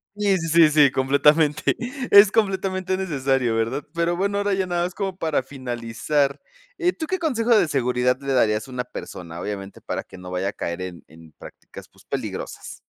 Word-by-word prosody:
Sí, 205 -2 +2
sí, 165 -2 -3
sí, 165 0 +6
sí, 150 -2 +5
completamente. 145 +3 +3 0.4
Es 200 0 +9
completamente 190 -3 0
necesario, 135 -9 0
¿verdad?, 115 +6 -1
pero 170 +1 +1
bueno, 200 +3 -1
ahora 205 0 0
ya 190 -1 0
nada 175 -1 0
más 180 0 -4
como 195 -2 -3
para 160 -6 0
finalizar, 130 +2 -2 0.4
eh, 360 0 +1
¿tú 320 - -5
qué 375 +4 -1
consejo 245 -8 +2
de 205 - +4
seguridad 125 -3 +1
le 140 -1 -2
darías 105 -3 +2
a - - -11
una 125 0 -3
persona, 85 -8 -8
obviamente, 100 -1 -6
para - - -4
que - - -14
no 90 0 -9
vaya 90 +2 -1
a - - -3
caer 85 -1 -4
en 90 -2 -8
en 80 0 -16
prácticas, - - -13
pues - - -23
peligrosas? - - -5
145 Hz, 190 wpm, -23 LUFS, 120-190 Hz, 0.4 s, Es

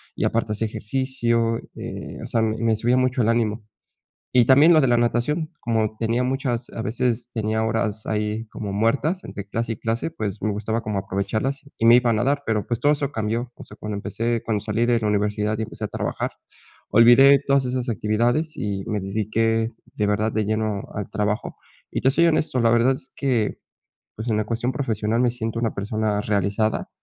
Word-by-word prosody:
y - - -1
aparte 115 -1 0
hacia 110 +2 -1
ejercicio, 115 +1 0 0.2
eh, - - -7
o - - -6
sea, 115 - 0
me 110 0 +1
subía 120 +4 +2
mucho 130 0 +1
el 115 - +2
ánimo. 115 -2 0 0.7
Y 125 -1 +5
también 145 +7 +6
lo 155 - +5
de 135 - +3
la 120 -1 +4
natación, 120 +7 0
como 110 -2 0
tenía 115 +2 0
muchas, 125 -2 -2
a 115 - -5
veces, 120 +1 -1
tenía 110 -1 -1
horas 110 -1 -1
ahí 105 +1 -1
como 105 -2 -5
muertas 140 - +1
entre 100 -1 -7
clase 115 +2 -2
y - - -5
clase, 115 +7 -2
pues, 105 - -5
me 110 - +1
gustaba 110 +3 -2
como 105 -3 -2
aprovecharlas 105 +8 -2 0.2
y 115 - +2
me 120 +1 +9
iba 125 -1 +3
a - - +3
nadar, 135 +6 +1
pero, 110 -2 0
pues, 120 0 -1
todo 145 +3 +4
eso 145 -2 -1
cambió. 115 +2 -2
O - - -12
sea, - - -13
cuando 105 -1 -4
empecé 115 +3 -2
cuando 110 -2 0
salí 110 +3 0
de 120 -1 +2
la 110 - -1
universidad, 105 +1 0
y 110 - -1
empecé 110 0 -6
a - - -2
trabajar, - - -3 0.6
olvidé 130 +5 +7
todas 140 -1 +3
esas 125 0 -2
actividades, 120 +8 0
y 100 -2 -3
me 105 -3 -1
dediqué 110 +3 0 0.3
de 105 - 0
verdad 105 +2 +1
de 110 0 0
lleno 110 -1 -1
al 105 -2 -4
trabajo. 105 0 -2 0.3
Y - - -2
te 130 - +4
soy 170 +5 +4
honesto, 155 -5 +1
la 115 -1 +4
verdad 120 +3 +4
es 130 0 -8
que, 125 -6 0 0.6
pues, 110 +2 -6
en 110 - +1
la 110 - +1
cuestión 115 +3 -1
profesional 115 -3 -1
me 125 - +3
siento 115 -1 -3
una 115 -2 -1
persona 105 +1 -1
realizada. 105 +1 0
115 Hz, 200 wpm, -23 LUFS, 105-125 Hz, 0.7 s, me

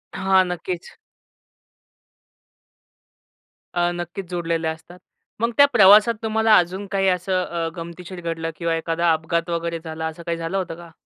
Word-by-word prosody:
हां, 190 0 +3
नक्कीच. 180 0 -5 2.8
अ, 175 0 +1
नक्कीचं 175 +2 -6
जोडलेले 170 -2 -2
असतात. 160 +3 -7 0.4
मग 230 +2 +1
त्या 285 - +9
प्रवासात 210 +2 +7
तुम्हाला 220 0 +3
अजून 185 +3 0
काही 195 -1 +1
असं 185 0 0
अ, 170 -1 -3
गमतीशीर 175 +1 -8
घडलं 165 -1 -3
किंवा 170 0 -1
एखादा 165 +1 0
अपघात 165 +2 -2
वगैरे 170 0 -2
झाला 160 -1 -4
असं 160 +1 -8
काही 170 -1 -2
झालं 165 +3 -3
होतं 180 -4 -3
का? 170 0 -13
175 Hz, 140 wpm, -22 LUFS, 165-190 Hz, 2.8 s, त्या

